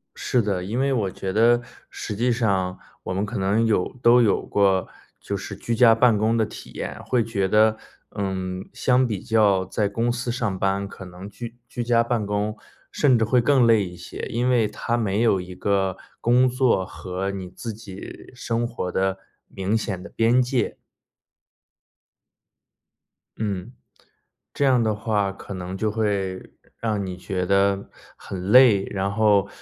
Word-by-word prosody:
是 125 - +1
的， 100 -4 -1
因 110 +7 -3
为 135 0 +2
我 105 -7 0
觉 95 +1 -5
得 120 +3 +5 0.3
实 105 - -6
际 120 +3 +1
上 95 -6 0 0.3
我 - - -3
们 100 +2 -1
可 105 - -5
能 100 +4 +2
有 105 -5 +2
都 120 +1 +6
有 105 -4 +2
过 95 -2 +2 0.3
就 100 - -4
是 100 +1 -6
居 115 +4 -3
家 115 -1 +6
办 115 -1 +4
公 110 +2 +1
的 110 - +2
体 - - -11
验， - - -6
会 120 -3 +1
觉 100 -4 -1
得 110 +2 +4 0.4
嗯， 95 -2 -3
相 130 0 +2
比 105 -5 -3
较 100 -4 +3
在 100 +2 -1
公 115 +4 0
司 120 0 -3
上 115 -6 -2
班， 100 +1 0
可 95 - -10
能 90 +2 -10
居 115 +2 -8
居 120 -1 -4
家 115 0 +3
办 115 -3 -1
公， 105 +1 -1 0.4
甚 130 -5 +3
至 110 - +2
会 125 +3 +3
更 130 -1 +4
累 115 -3 +5
一 90 -1 -7
些， 90 - -10
因 120 +2 0
为 120 -4 +3
它 115 +3 -2
没 105 -2 0
有 110 -5 +3
一 90 0 -9
个 95 -1 0 0.2
工 125 +2 +4
作 125 -6 +2
和 95 +2 -4
你 95 -2 -6
自 115 +4 -7
己 100 -3 -10
生 120 -1 -1
活 105 -6 -4
的 95 +1 0 0.3
明 95 +2 -2
显 100 -5 -2
的 100 - -9
边 115 +2 +3
界。 125 0 -1 2.6
嗯。 105 +2 -3 0.8
这 145 - 0
样 130 -3 +4
的 110 -1 +1
话 105 -2 -1
可 100 - -10
能 95 0 -5
就 110 +1 0
会 100 -3 0 0.5
让 110 -2 -1
让 100 - -2
你 90 -1 -5
觉 90 0 -3
得 100 +1 +1 0.3
很 95 -2 -7
累， 115 -6 +7
然 100 0 -1
后 100 -2 +3
105 Hz, 185 characters per minute, -23 LUFS, 95-115 Hz, 2.6 s, 累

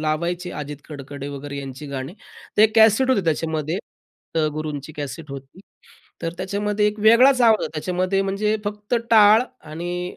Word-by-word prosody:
लावायचे 170 +3 -2
अजित 150 0 -6
कडकडे 140 -1 -7
वगैरे 140 0 -7
यांची 135 +1 -7
गाणी. 135 +3 -6 0.4
ते 215 - +7
कॅसेट 225 +4 +5
होते 200 -8 +2
त्याच्यामध्ये, 160 0 -1 0.6
त्या 160 -1 +2
गुरूंची 155 -1 -5
कॅसेट 150 +1 -6
होती. 135 +5 -10 0.6
तर 165 - -2
त्याच्यामध्ये 205 +2 0
एक 210 +1 -2
वेगळाच 250 +5 +6
आवाज 225 -3 +5
आहे. - - -2
त्याच्यामध्ये 185 +4 0
म्हणजे 205 +2 0
फक्त 210 +2 -3 0.2
टाळ 215 0 +7 0.3
आणि 175 +3 -5
175 Hz, 150 wpm, -22 LUFS, 150-210 Hz, 0.6 s, ते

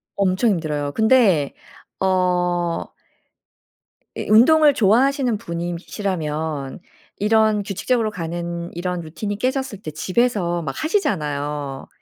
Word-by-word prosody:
엄청 195 +3 +2
힘들어요. 150 -5 -2
근데 220 - +3 0.5
어 180 -2 +1 1.3
이 - - -5
운동을 290 +7 +6
좋아하시는 245 +2 +2
분이시라면 170 -5 -4 0.4
이런 215 0 +3
규칙적으로 220 +3 -1
가는 170 -1 -4
이런 180 0 -3
루틴이 200 +6 -5
깨졌을 255 -3 -2
때 155 - -6
집에서 185 0 0
막 140 -4 -4
하시잖아요. 150 - -2
185 Hz, 250 characters per minute, -21 LUFS, 165-220 Hz, 1.3 s, 운동을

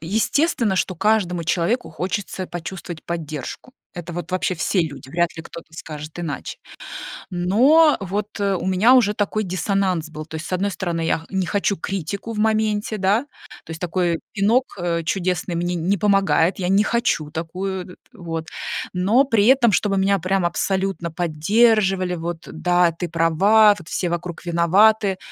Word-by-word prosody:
естественно, 220 - +1
что 185 - 0
каждому 180 -4 +1
человеку 175 +3 0
хочется 185 +2 -4
почувствовать 175 -1 -7
поддержку. 160 - -6 0.2
Это 175 0 -6
вот 175 +2 -6
вообще 185 -1 0
все 175 +3 +1
люди, 140 -5 -5
вряд 170 +3 -1
ли 165 - -6
кто-то 165 -2 -11
скажет 155 0 -8
иначе. 160 -5 -5 0.7
Но 245 - +4
вот, 200 +2 -4
э, 200 -1 +1
у 175 - -5
меня 190 +7 +4
уже 225 -5 +4
такой 210 +1 -1
диссонанс 185 -2 -1
был, 155 0 -8
то 160 0 -8
есть, 160 - -6
с - - -8
одной 195 +3 0
стороны, 170 -4 -3
я 165 - +1
х 160 - -14
не 190 -1 -1
хочу 200 +2 0
критику 195 +5 -4
в 215 - -6
моменте, 215 0 +1
да, 205 +7 +1 0.4
то - - -11
есть 160 0 -7
такой 175 -1 0
пинок, 230 +5 +2
э, 170 -1 -1
чудесный 180 0 -1
мне 175 +1 -1
не 180 +4 0
помогает, 195 -3 +2
я 180 -1 -1
не 195 +2 +4
хочу 170 -10 0
такую, 180 +3 -4
э, - - -13 0.2
вот. 165 -4 -5 0.5
Но 205 +9 +3
при 225 -7 +2
этом, 250 -4 +5
чтобы 195 0 +1
меня 195 +1 +2
прям 185 0 0
абсолютно 190 0 -1
поддерживали: 185 +3 +2
"Вот, 170 0 -5
да, 175 +1 +2
ты 170 +1 -5
права, 195 +6 +4
вот 175 - -12
все 180 - -1
вокруг 175 0 -5
виноваты, 190 +4 +3
185 Hz, 165 wpm, -21 LUFS, 170-205 Hz, 0.7 s, этом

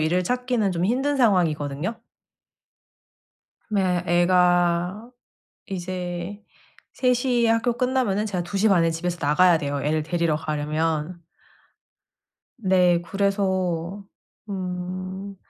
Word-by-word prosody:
일을 175 +4 +1
찾기는 245 -3 0
좀 175 +1 0
힘든 270 +6 0
상황이거든요. 170 - +1 1.7
네 185 -5 +1
애가 175 +3 +2 0.6
이제 180 +1 -5 0.5
3:00 250 -1 +1
에 - - +3
학교 230 +2 +2
끝나면은 250 -6 +1
제가 185 -4 -2
2:30 195 -1 +2
에 165 - +2
집에서 175 +2 -3
나가야 170 +4 +5
돼요 145 -2 -3
애를 155 +1 0
데리러 170 -1 0
가려면. 155 +2 -2 1.4
네 185 -5 +3
그래서 190 -1 -1 0.4
음 185 +1 -5
180 Hz, 195 characters per minute, -24 LUFS, 170-205 Hz, 1.7 s, 나가야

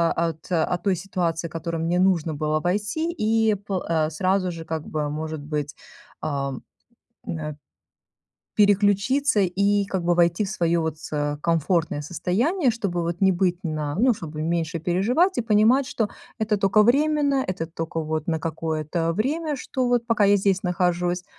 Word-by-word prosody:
от 165 -2 -2
от 175 +1 0
той 195 -2 +2
ситуации, 170 -2 -2
в - - -25
которую 165 0 -3
мне 175 +2 +1
нужно 170 -4 +2
было 155 +1 -1
войти, 210 - -1
и 220 -6 +2
по 195 -2 -4
э, 160 -2 +2
сразу 185 +3 0
же 165 -1 -7
как 160 -1 -5
бы, 150 -1 -2
может 155 0 -4
быть, 145 -1 -4 0.5
эм, 140 -3 -3 0.6
эна 150 -2 -4 1.0
переключиться 205 +5 +3
и 200 +2 +2
как 190 -3 -3
бы 175 - +3
войти 170 +3 +3
в 195 - -5
свое 170 -4 +1
вот 160 -1 -3
с 145 -2 -3
комфортное 165 -1 0
состояние, 235 - 0
чтобы 200 -6 -2
вот 170 +3 -3
не 190 -1 +5
быть 180 -1 +1
на 155 -3 -3
ну, 245 +5 +4
чтобы 155 -6 -6
меньше 165 0 -1
переживать 240 - +2
и - - +3
понимать, 230 +4 +3
что 220 -5 -2 0.3
это 215 -2 0
тока 200 +2 +4
временно, 285 +2 +3
это 170 -3 -3
тока 165 0 -4
вот 155 -1 -3
на 160 -2 0
какое-то 160 0 -2
время, 295 - -1
что 255 -1 -2
вот 240 -1 +1
пока 230 -3 +3
я 200 0 +5
здесь 195 -1 +1
нахожусь. 180 0 0
180 Hz, 165 wpm, -24 LUFS, 160-210 Hz, 1.0 s, не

